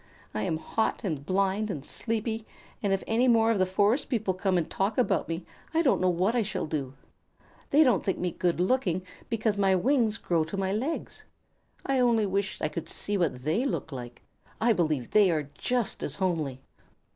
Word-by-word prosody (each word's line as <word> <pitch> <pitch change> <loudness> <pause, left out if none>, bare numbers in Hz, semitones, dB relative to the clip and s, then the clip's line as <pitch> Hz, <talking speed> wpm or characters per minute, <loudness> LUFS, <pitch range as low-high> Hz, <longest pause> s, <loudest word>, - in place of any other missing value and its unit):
I 110 - -2
am 160 +8 0
hot 220 +8 -1
and 155 -9 -2
blind 195 +5 0
and 150 -7 -4
sleepy, 225 -1 -3 0.3
and 200 - 0
if 195 - +1
any 235 +3 +2
more 230 -2 +5
of 215 - +1
the 185 - +3
forest 205 +7 +2
people 220 -7 0
come 185 0 +1
and 170 - 0
talk 200 +3 -1
about 250 - +1
me, 165 +1 -3 0.3
I 330 - +4
don't 265 - +3
know 185 - +3
what 180 +5 +1
I 240 - +3
shall 210 -1 -2
do. 140 -4 -3 0.7
They 300 +3 +6
don't 255 -4 +3
think 190 - 0
me 180 -1 -1
good 175 0 0
looking 185 -3 +1 0.3
because 220 -2 0
my 195 -1 +4
wings 230 +1 +2
grow 170 -6 +1
to 165 +5 -5
my 190 -1 0
legs. 260 +11 -3 0.6
I 270 -1 +1
only 235 -3 +3
wish 195 0 -1
I - - +3
could 165 +1 -6
see 205 - -3
what 160 -9 0
they 160 - +1
look 270 - -2
like. 120 -2 -8 0.4
I 230 +1 +4
believe 155 - 0
they 210 -3 +5
are 150 -4 -1
just 245 -4 -1
as - - -2
homely." 155 -9 -1
195 Hz, 200 wpm, -28 LUFS, 170-225 Hz, 0.7 s, They